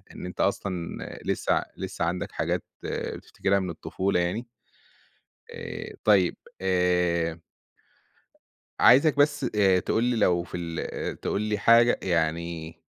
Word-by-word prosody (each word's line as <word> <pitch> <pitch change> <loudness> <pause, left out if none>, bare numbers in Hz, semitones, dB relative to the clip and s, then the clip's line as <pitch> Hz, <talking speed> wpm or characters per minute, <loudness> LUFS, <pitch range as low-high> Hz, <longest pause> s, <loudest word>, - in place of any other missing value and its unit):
إن - - -7
أنت 90 - -4
أصلًا 95 -3 -1 0.3
لسه - - 0
ع - - +1
لسه - - -3
عندك 90 +1 -2
حاجات - - -1 0.2
آآ، - - -3
بتفتكرها 100 0 -1
من 95 -1 -3
الطفولة 95 +3 -1
يعني. 90 +8 -1 1.0
آآ - - -7
طيب 95 -5 +4 0.3
آآ 90 -3 +1 1.4
عايزك 140 +4 +6
بس 145 -2 +3
آآ 95 -3 +4
تقول 110 +5 0
لي 125 0 +1
لو 90 -5 +3
في 85 - -7
ال 85 -1 -4
تقول 100 - -1
لي 105 -1 -1
حاجة 115 +3 +5
يعني 85 -1 -1
90 Hz, 130 wpm, -26 LUFS, 85-105 Hz, 1.4 s, عايزك